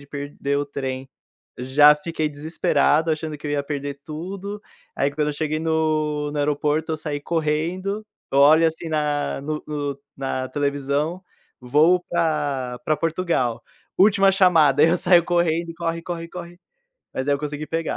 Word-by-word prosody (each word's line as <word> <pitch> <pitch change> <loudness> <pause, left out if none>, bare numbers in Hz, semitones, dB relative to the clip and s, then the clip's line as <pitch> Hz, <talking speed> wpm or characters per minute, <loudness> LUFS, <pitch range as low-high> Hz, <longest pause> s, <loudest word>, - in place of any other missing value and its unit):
de 140 - -15
perder 140 0 -3
o 145 - -1
trem, 135 -2 -5 0.5
já 145 +4 +6
fiquei 155 0 -3
desesperado, 155 +1 +1
achando 155 -1 -3
que 150 - -8
eu - - -2
ia 145 -1 0
perder 140 -1 -5
tudo. 195 +6 -6 0.3
Aí 140 - +1
quando 150 0 0
eu - - -1
cheguei 155 0 -1
no 155 -2 0
no 150 - -3
aeroporto, 150 +2 0
eu 155 - -1
saí 150 -2 -4
correndo. 170 +7 -2 0.3
Eu 140 - +4
olho, 155 +3 +7
assim, 160 +1 -3
na 150 -3 -1
no 150 +1 -4
no 145 -2 -3 0.2
na 130 -1 -3
televisão, 145 +5 -1 0.4
voo 155 +8 +3
pra 145 -7 -1
pra 155 - +1
Portugal: 160 -9 -1 0.4
última 195 0 +5
chamada, 165 -7 +5
aí 160 - +6
eu 175 - +3
saio 175 -1 +4
correndo, 170 -1 +1
e 165 - -9
corre, 165 0 -3
corre, 170 -1 -5
corre. 175 0 -9 0.6
Mas 130 +2 -3
aí 145 - +4
eu - - -2
consegui 150 +1 -5
pegar. 165 +1 -2
155 Hz, 165 wpm, -23 LUFS, 145-165 Hz, 0.6 s, olho